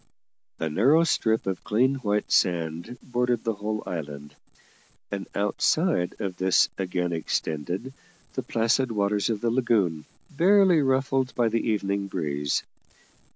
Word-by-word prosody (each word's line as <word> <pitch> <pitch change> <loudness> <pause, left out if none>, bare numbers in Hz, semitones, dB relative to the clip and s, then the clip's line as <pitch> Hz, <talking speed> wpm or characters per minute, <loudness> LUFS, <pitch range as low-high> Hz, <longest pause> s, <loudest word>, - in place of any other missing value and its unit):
A 80 - -2
narrow 130 - +4
strip 110 -8 +1
of 95 -2 -3
clean 125 +6 +2
white 105 -5 -1
sand 85 +5 0
bordered 125 -1 0
the 115 - 0
whole 105 +1 -4
island, 75 -3 -6 0.8
and 100 -1 -4
outside 105 - +1
of 95 -4 -4
this 95 0 +3
again 90 -2 -2
extended 85 - -3 0.4
the - - -2
placid 115 +3 +1
waters 105 0 0
of 110 -3 -2
the 115 - +1
lagoon, 105 -11 +1 0.3
barely 185 0 +5
ruffled 135 -1 +1
by 120 -2 +2
the 115 +1 0
evening 100 -2 -1
breeze. 75 -6 -2
105 Hz, 130 wpm, -26 LUFS, 90-125 Hz, 0.8 s, barely